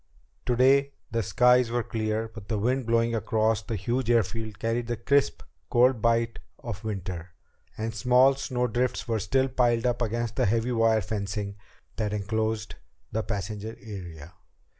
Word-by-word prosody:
Today 135 Hz, +3 st, +4 dB, 0.2 s
the 115 Hz, 0 st, 0 dB
skies 125 Hz, +5 st, +4 dB
were 120 Hz, 0 st, 0 dB
clear, 110 Hz, -1 st, -2 dB
but 110 Hz, -2 st, -11 dB
the 110 Hz, -, -1 dB
wind 125 Hz, +4 st, 0 dB
blowing 115 Hz, 0 st, +2 dB
across 110 Hz, -1 st, +1 dB
the 110 Hz, +2 st, -4 dB
huge 120 Hz, +5 st, -1 dB
airfield 110 Hz, -2 st, 0 dB
carried 115 Hz, +1 st, -1 dB
the 120 Hz, -1 st, -2 dB
crisp, 140 Hz, +4 st, +1 dB, 0.3 s
cold 125 Hz, -1 st, +4 dB
bite 115 Hz, 0 st, +1 dB, 0.2 s
of 115 Hz, -2 st, -7 dB
winter, 90 Hz, -5 st, -5 dB, 0.4 s
and 110 Hz, +1 st, -3 dB
small 125 Hz, +4 st, +5 dB
snowdrifts 125 Hz, -2 st, -1 dB
were 115 Hz, -2 st, 0 dB
still 130 Hz, +7 st, +1 dB
piled 120 Hz, -2 st, +1 dB
up 125 Hz, 0 st, 0 dB
against 115 Hz, 0 st, -2 dB
the -, -, +3 dB
heavy 115 Hz, +4 st, +1 dB
wire 115 Hz, -2 st, +3 dB
fencing 100 Hz, 0 st, -3 dB, 0.4 s
that 105 Hz, -1 st, -1 dB
enclosed 110 Hz, +1 st, -2 dB, 0.4 s
the 110 Hz, -, 0 dB
passenger 105 Hz, +1 st, -4 dB
area. 90 Hz, -6 st, -9 dB
115 Hz, 150 wpm, -27 LUFS, 105-120 Hz, 0.4 s, small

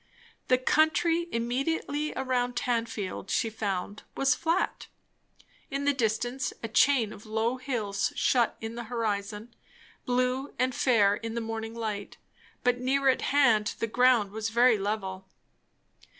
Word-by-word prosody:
The 255 Hz, -, +4 dB
country 325 Hz, +5 st, +2 dB
immediately 275 Hz, +5 st, -1 dB
around 250 Hz, -2 st, -1 dB
Tanfield 230 Hz, -6 st, -2 dB
she 225 Hz, -, 0 dB
found 205 Hz, -2 st, -3 dB, 0.2 s
was 275 Hz, 0 st, +3 dB
flat; 335 Hz, +2 st, -1 dB, 0.8 s
in 280 Hz, -1 st, -3 dB
the 285 Hz, -, +3 dB
distance 245 Hz, +1 st, -1 dB
a -, -, -1 dB
chain 235 Hz, -1 st, +3 dB
of 210 Hz, -, -13 dB
low 225 Hz, +3 st, 0 dB
hills 225 Hz, -7 st, -2 dB
shut 240 Hz, -3 st, +2 dB
in 225 Hz, 0 st, -5 dB
the 235 Hz, 0 st, -6 dB
horizon, 215 Hz, -1 st, -3 dB, 0.5 s
blue 255 Hz, +2 st, 0 dB
and 255 Hz, 0 st, +1 dB
fair 210 Hz, -6 st, +3 dB
in 225 Hz, 0 st, -6 dB
the -, -, 0 dB
morning 225 Hz, 0 st, -5 dB
light; 215 Hz, -3 st, -4 dB, 0.5 s
but 250 Hz, 0 st, +2 dB
near 270 Hz, +2 st, +2 dB
at 260 Hz, -, +2 dB
hand 235 Hz, -7 st, +3 dB
the -, -, -1 dB
ground 235 Hz, -2 st, +3 dB
was 220 Hz, +1 st, -3 dB
very 235 Hz, -1 st, +4 dB
level. 195 Hz, -2 st, -3 dB
235 Hz, 135 wpm, -28 LUFS, 220-255 Hz, 0.8 s, The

